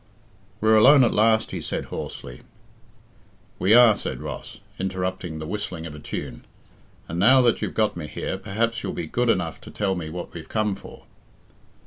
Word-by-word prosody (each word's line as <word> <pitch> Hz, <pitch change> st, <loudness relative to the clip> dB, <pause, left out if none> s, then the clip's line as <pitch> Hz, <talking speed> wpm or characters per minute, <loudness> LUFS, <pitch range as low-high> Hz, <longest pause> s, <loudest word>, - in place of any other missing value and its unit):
"We're 110 Hz, 0 st, +5 dB
alone 135 Hz, +5 st, +7 dB
at 120 Hz, -, +2 dB
last," 110 Hz, +1 st, +3 dB
he -, -, -4 dB
said -, -, -3 dB
hoarsely. 60 Hz, +1 st, -7 dB, 1.2 s
"We 95 Hz, +5 st, +5 dB
are," 120 Hz, -3 st, +8 dB
said -, -, -4 dB
Ross, -, -, -7 dB, 0.2 s
interrupting 95 Hz, -3 st, -3 dB
the 80 Hz, -, -6 dB
whistling 90 Hz, -2 st, -4 dB
of 80 Hz, -, -7 dB
a 75 Hz, -, -9 dB
tune, -, -, -6 dB, 0.6 s
"and 85 Hz, -, -4 dB
now 130 Hz, +7 st, +6 dB
that 120 Hz, -2 st, +2 dB
you've -, -, -3 dB
got 110 Hz, -1 st, +1 dB
me 85 Hz, -3 st, -6 dB
here, 95 Hz, -, -4 dB
perhaps 110 Hz, +4 st, -1 dB
you'll -, -, -4 dB
be 85 Hz, -, -4 dB
good 120 Hz, +9 st, 0 dB
enough 85 Hz, -7 st, 0 dB
to -, -, -11 dB
tell 100 Hz, -2 st, -1 dB
me 85 Hz, -4 st, -5 dB
what 90 Hz, +2 st, -7 dB
we've 80 Hz, -2 st, -9 dB
come 110 Hz, -2 st, 0 dB
for." 100 Hz, -, -12 dB
100 Hz, 180 wpm, -24 LUFS, 85-110 Hz, 1.2 s, are